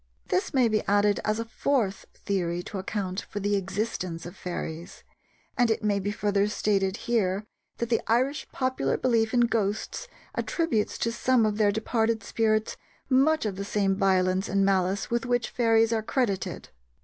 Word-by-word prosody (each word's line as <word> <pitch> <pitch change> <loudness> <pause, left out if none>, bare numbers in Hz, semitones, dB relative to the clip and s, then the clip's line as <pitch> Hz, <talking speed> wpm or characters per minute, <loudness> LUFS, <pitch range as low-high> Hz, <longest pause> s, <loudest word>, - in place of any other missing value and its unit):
This 180 +2 0
may 255 -3 +4
be 215 -1 +1
added 205 0 +3
as 215 +1 0
a 230 - -2
fourth 225 -4 -1
theory 175 -3 -2
to 195 - -6
account 190 -1 -3
for 205 - -6
the 205 +1 +1
existence 195 -3 -3
of 175 +2 -8
fairies, 170 -2 -6 0.5
and 245 -3 +3
it 220 - 0
may 205 -1 +2
be 200 +1 -2
further 205 -1 +1
stated 200 -2 0
here 210 -4 +1 0.3
that 235 - -2
the 230 - +2
Irish 260 +6 +1
popular 255 - 0
belief 230 -3 +2
in 245 - +3
ghosts 225 - -1 0.3
attributes 325 -11 -1
to 230 - 0
some 240 0 +2
of 210 0 -1
their 205 -1 +4
departed 220 +1 0
spirits 215 -1 0 0.3
much 280 +2 +3
of 200 -3 -2
the 200 - -3
same 200 -1 +1
violence 190 -1 +2
and 195 0 +2
malice 195 +1 +1
with 235 0 0
which 245 -1 0
fairies 225 -1 +3
are 220 - +1
credited. 220 -4 -2
210 Hz, 170 wpm, -27 LUFS, 195-230 Hz, 0.5 s, may